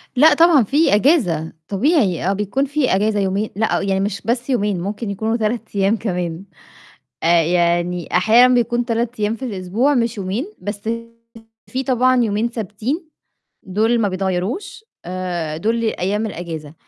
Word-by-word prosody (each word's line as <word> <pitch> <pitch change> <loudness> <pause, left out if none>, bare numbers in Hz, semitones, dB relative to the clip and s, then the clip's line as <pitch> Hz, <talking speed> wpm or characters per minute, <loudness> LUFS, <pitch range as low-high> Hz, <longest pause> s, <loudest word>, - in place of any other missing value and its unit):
لأ 300 +4 +6
طبعًا 325 -4 +5
في 285 +1 +3
إجازة، 210 - +2
طبيعي. 205 - +1
آه، - - +2
بيكون 210 +7 -1
فيه 280 -7 +1
إجازة 210 +1 +1
يومين 200 +2 -1
لأ، 220 0 0
يعني 195 -1 0
مش 200 -1 -2
بس 240 +2 -1
يومين، 205 -7 0
ممكن 205 +3 -4
يكونوا 220 +4 -1
3 220 0 -3
أيام 200 +3 +2
كمان. 180 -4 -3 0.8
آآ، 170 0 +4
يعني 175 +1 0
أحيانًا 235 +7 +5
بيكون 240 0 +1
3 235 -1 -2
أيام 210 +2 +1
في 260 - -7
الأسبوع 220 +5 0
مش 235 -2 0
يومين، 195 - -3
بس 205 0 -5 0.9
فيه 260 +1 -2
طبعًا 255 0 +3
يومين 220 +2 0
ثابتين 235 - -4 0.5
دُول 220 +5 +1
ما 210 - +2
بيتغيّروش 195 - -3 0.2
آآ، 175 -3 -4
دُول 225 +6 -1
أيام 210 +1 -1
الإجازة. 160 -6 -7
210 Hz, 150 wpm, -19 LUFS, 185-245 Hz, 0.9 s, لأ